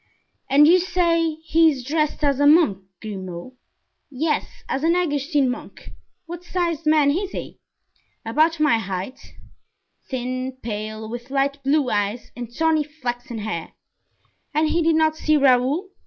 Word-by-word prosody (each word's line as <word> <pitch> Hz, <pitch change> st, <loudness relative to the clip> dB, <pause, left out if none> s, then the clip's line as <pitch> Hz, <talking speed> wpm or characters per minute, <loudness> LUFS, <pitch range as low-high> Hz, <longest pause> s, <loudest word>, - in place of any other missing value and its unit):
"And 285 Hz, +3 st, +6 dB
you 360 Hz, +3 st, +6 dB
say 335 Hz, -3 st, +1 dB
he 325 Hz, 0 st, +4 dB
is 270 Hz, -4 st, -3 dB
dressed 305 Hz, +3 st, -1 dB
as 280 Hz, -2 st, +2 dB
a 285 Hz, -, +4 dB
monk, 300 Hz, -, +5 dB, 0.2 s
Grimaud?" 190 Hz, +1 st, -7 dB, 0.6 s
"Yes, 300 Hz, +3 st, -2 dB
as 270 Hz, -, -2 dB
an 335 Hz, +2 st, +3 dB
Augustine 290 Hz, -4 st, +1 dB
monk." 250 Hz, -, -7 dB, 0.3 s
"What 345 Hz, +1 st, -8 dB
sized 340 Hz, -3 st, -2 dB
man 305 Hz, -2 st, +4 dB
is 370 Hz, +6 st, -2 dB
he?" -, -, -7 dB, 0.7 s
"About 310 Hz, +8 st, +2 dB
my 295 Hz, -7 st, +3 dB
height; 195 Hz, +4 st, -5 dB, 0.9 s
thin, 255 Hz, 0 st, -4 dB
pale, 215 Hz, 0 st, -5 dB
with 240 Hz, +3 st, -7 dB
light 275 Hz, +1 st, 0 dB
blue 275 Hz, -1 st, +2 dB
eyes 205 Hz, +3 st, -2 dB
and 240 Hz, -1 st, -7 dB
tawny 320 Hz, +3 st, +1 dB
flaxen 245 Hz, -5 st, -6 dB
hair." 210 Hz, -6 st, -5 dB, 0.8 s
"And 310 Hz, 0 st, +2 dB
he 340 Hz, -, +1 dB
did 325 Hz, 0 st, +3 dB
not 315 Hz, 0 st, +2 dB
see 310 Hz, -1 st, +2 dB
Raoul?" 275 Hz, +7 st, +2 dB
285 Hz, 145 wpm, -22 LUFS, 245-320 Hz, 0.9 s, And